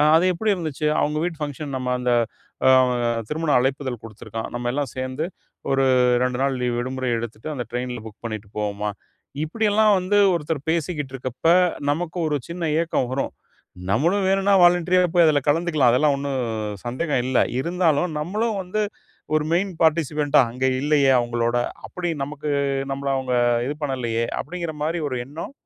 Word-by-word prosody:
அது 165 Hz, +3 st, +5 dB
எப்டி 210 Hz, +5 st, 0 dB
இருந்துச்சு? 155 Hz, -4 st, -3 dB
அவங்க 150 Hz, +1 st, 0 dB
வீட்டு 170 Hz, -2 st, -3 dB
ஃபங்ஷன். 145 Hz, 0 st, -5 dB
நம்ம 130 Hz, -1 st, -3 dB
அந்த 125 Hz, 0 st, 0 dB, 1.2 s
திருமண 160 Hz, 0 st, -2 dB
அழைப்பிதழ் 130 Hz, -2 st, -1 dB
கொடுத்துருக்கான், 110 Hz, 0 st, -7 dB
நம்மல்லாம் 120 Hz, +3 st, -2 dB
சேர்ந்து 130 Hz, +4 st, -3 dB, 0.5 s
ஒரு 135 Hz, 0 st, +3 dB, 0.4 s
2 125 Hz, -1 st, 0 dB
நாள் 135 Hz, -1 st, +1 dB
லீவ் 125 Hz, -1 st, 0 dB
விடுமுறை 130 Hz, +1 st, -2 dB
எடுத்துட்டு, 115 Hz, +3 st, -6 dB
அந்த 125 Hz, -3 st, -3 dB
ட்ரெயின்ல 125 Hz, 0 st, -3 dB
புக் 110 Hz, -1 st, -12 dB
பண்ணிட்டு 110 Hz, -2 st, -6 dB
போவோமா?" 105 Hz, 0 st, -2 dB, 0.5 s
இப்டியெல்லாம் 215 Hz, +4 st, +3 dB
வந்து 185 Hz, +3 st, 0 dB, 0.2 s
ஒருத்தர் 150 Hz, -3 st, -2 dB
பேசிக்கிட்டு 155 Hz, -4 st, -2 dB
இருக்கப்ப, 130 Hz, +3 st, -2 dB, 0.4 s
நமக்கு 165 Hz, +3 st, -2 dB
ஒரு 150 Hz, -, 0 dB
சின்ன 170 Hz, -1 st, -3 dB
ஏக்கம் 160 Hz, -6 st, -1 dB
வரும். 135 Hz, -, -2 dB, 0.6 s
நம்மளும் 170 Hz, -, +2 dB
வேணுன்னா 195 Hz, +1 st, +3 dB
வாலண்டரியா 180 Hz, +1 st, +4 dB
போய் 175 Hz, -1 st, +6 dB
அதுல 150 Hz, -2 st, +3 dB
கலந்துக்கலாம். 155 Hz, -4 st, +3 dB
அதெல்லாம் 145 Hz, +3 st, +3 dB
ஒண்ணும் 140 Hz, -1 st, -2 dB, 0.5 s
சந்தேகம் 130 Hz, +3 st, -1 dB
இல்ல. 130 Hz, -1 st, +1 dB, 0.2 s
இருந்தாலும், 170 Hz, 0 st, +1 dB
நம்மளும் 210 Hz, +7 st, -1 dB
வந்து, 185 Hz, +4 st, -3 dB, 0.5 s
ஒரு 155 Hz, -1 st, +2 dB
மெயின் 190 Hz, +3 st, +1 dB
பார்ட்டிசிபன்ட்டா 150 Hz, -2 st, +3 dB
அங்க 125 Hz, +2 st, -4 dB, 0.2 s
இல்லயே, 145 Hz, -2 st, +3 dB
அவங்களோட. 120 Hz, 0 st, -1 dB, 0.3 s
அப்டி 180 Hz, -1 st, -3 dB
நமக்கு 150 Hz, +2 st, -4 dB, 0.4 s
நம்மள 140 Hz, 0 st, -3 dB
அவுங்க 130 Hz, -1 st, -1 dB, 0.3 s
இது 145 Hz, -, -2 dB
பண்ணலையே, 120 Hz, -5 st, -1 dB, 0.2 s
அப்டின்கிற 170 Hz, 0 st, -5 dB
மாரி 165 Hz, +2 st, -1 dB
ஒரு 130 Hz, -2 st, -3 dB
எண்ணம் 155 Hz, -, -7 dB
145 Hz, 145 wpm, -23 LUFS, 125-170 Hz, 1.2 s, போய்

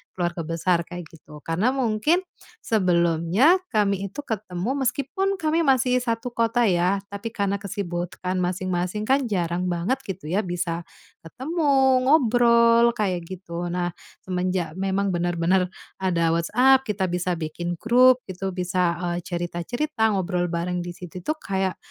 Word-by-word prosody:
Keluarga 175 Hz, -2 st, -2 dB
besar 170 Hz, +1 st, +1 dB
kayak 175 Hz, 0 st, -7 dB
gitu. 150 Hz, -2 st, -14 dB
Karena 200 Hz, +11 st, 0 dB
mungkin 265 Hz, +9 st, +1 dB, 0.4 s
sebelumnya 180 Hz, -, +3 dB
kami 200 Hz, -3 st, 0 dB
itu 245 Hz, +10 st, -8 dB
ketemu 210 Hz, -1 st, -3 dB, 0.2 s
meskipun 385 Hz, +10 st, -1 dB
kami 320 Hz, -2 st, 0 dB
masih 255 Hz, -1 st, +3 dB
1 240 Hz, 0 st, -2 dB
kota 235 Hz, +1 st, +1 dB
ya, 190 Hz, 0 st, +2 dB
tapi 200 Hz, +3 st, -5 dB
karena 200 Hz, -3 st, -1 dB
kesibukan 185 Hz, -2 st, -4 dB
masing-masing 185 Hz, +2 st, -1 dB
kan 265 Hz, +2 st, +2 dB
jarang 180 Hz, -2 st, -1 dB
banget 180 Hz, +10 st, -1 dB
gitu 180 Hz, -5 st, -6 dB
ya 195 Hz, -, +2 dB
bisa 175 Hz, -3 st, -3 dB, 0.3 s
ketemu, 265 Hz, -, +1 dB
ngobrol 235 Hz, -4 st, +5 dB
kayak 180 Hz, -5 st, -1 dB
gitu. 175 Hz, -2 st, -6 dB
Nah, 175 Hz, 0 st, -2 dB, 0.3 s
semenjak 180 Hz, -2 st, -2 dB
memang 195 Hz, +1 st, 0 dB
benar-benar 175 Hz, +1 st, +1 dB, 0.3 s
ada 170 Hz, -3 st, +1 dB
WhatsApp, 250 Hz, +10 st, +3 dB
kita 190 Hz, -3 st, -1 dB
bisa 180 Hz, 0 st, -1 dB
bikin 170 Hz, +2 st, -4 dB
grup 250 Hz, +6 st, +4 dB
gitu, 190 Hz, 0 st, -4 dB
bisa, 180 Hz, -1 st, 0 dB, 0.2 s
eee, 175 Hz, -, -2 dB
cerita-cerita, 215 Hz, -, -1 dB
ngobrol 180 Hz, -1 st, 0 dB
bareng 175 Hz, +1 st, -2 dB
di 175 Hz, 0 st, -6 dB
situ. 180 Hz, 0 st, -9 dB
Itu 305 Hz, -, -2 dB
kayak 190 Hz, -, -2 dB
190 Hz, 135 wpm, -24 LUFS, 175-235 Hz, 0.4 s, ngobrol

